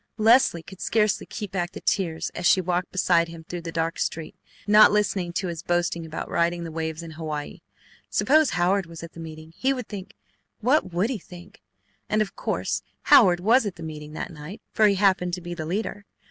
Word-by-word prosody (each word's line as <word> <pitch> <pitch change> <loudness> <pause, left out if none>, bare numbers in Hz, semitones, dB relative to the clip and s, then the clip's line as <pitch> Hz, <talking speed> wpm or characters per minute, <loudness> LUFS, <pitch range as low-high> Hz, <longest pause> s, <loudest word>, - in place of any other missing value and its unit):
Leslie 220 -6 +4
could 190 +2 -12
scarcely 215 -2 +1
keep 210 -4 -6
back 175 -2 -2
the - - -7
tears 165 -5 -1
as 175 - -1
she 185 - +5
walked 180 0 -1
beside 175 -2 +3
him 165 -1 -10
through 175 +1 -6
the 165 0 -6
dark 165 0 -2
street, 160 -1 -3 0.3
not 210 +1 +7
listening 200 -4 0
to 180 +3 -2
his 170 -2 -4
boasting 175 -1 -1
about 160 - -5
riding 170 0 0
the 165 - -6
waves 160 0 -4
in 165 - -8
Hawaii. 155 -2 -5 0.5
Suppose 310 +1 +3
Howard 180 +1 +1
was 165 0 -10
at 165 - -10
meeting! 160 -1 -9
He 270 +1 +1
would 250 -4 -5
think 200 -3 -8 0.4
what 245 -4 +2
would 185 +8 0
he 240 - -3
think? 180 +2 -14 0.5
And 215 - +2
of 215 -2 -1
course - - -2 0.3
Howard 175 -5 +7
was 225 +4 +4
at 195 - -5
the 165 - -9
meeting 150 -1 -8
that 160 - -5
night, 155 +7 -9
for 215 - +4
he 200 - +3
happened 185 -2 +2
to - - -8
be 175 0 -6
the 160 -3 -5
leader. 205 +3 -3
175 Hz, 205 wpm, -25 LUFS, 165-205 Hz, 0.5 s, not